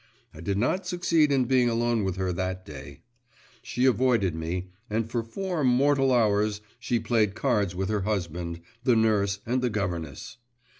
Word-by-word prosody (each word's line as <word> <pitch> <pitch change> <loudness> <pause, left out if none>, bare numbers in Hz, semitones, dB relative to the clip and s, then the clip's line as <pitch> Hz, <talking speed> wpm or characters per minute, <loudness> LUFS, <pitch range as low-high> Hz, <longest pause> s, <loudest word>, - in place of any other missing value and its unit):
I 80 - -11
did 95 +3 -1
not 180 - 0
succeed 170 -4 +2
in 135 -2 +3
being 125 -1 +3
alone 115 -1 +1
with 95 -2 -1
her 95 -1 -1
that 95 +1 -3
day. 70 -1 -10 0.6
She 125 +3 -1
avoided 120 -8 +3
me, 90 +3 -4 0.2
and 110 +1 -1
for 115 +1 -1
four 175 +8 -3
mortal 135 +1 +3
hours 105 -3 +2 0.2
she 120 - 0
played 110 -3 +1
cards 100 -5 0
with 95 +1 -2
her 105 -2 0
husband, 85 -4 -3 0.2
the 125 -2 +4
nurse, 100 -3 +2
and 125 +2 0
the 125 - +1
governess! 85 - -4
110 Hz, 165 wpm, -27 LUFS, 95-125 Hz, 0.6 s, the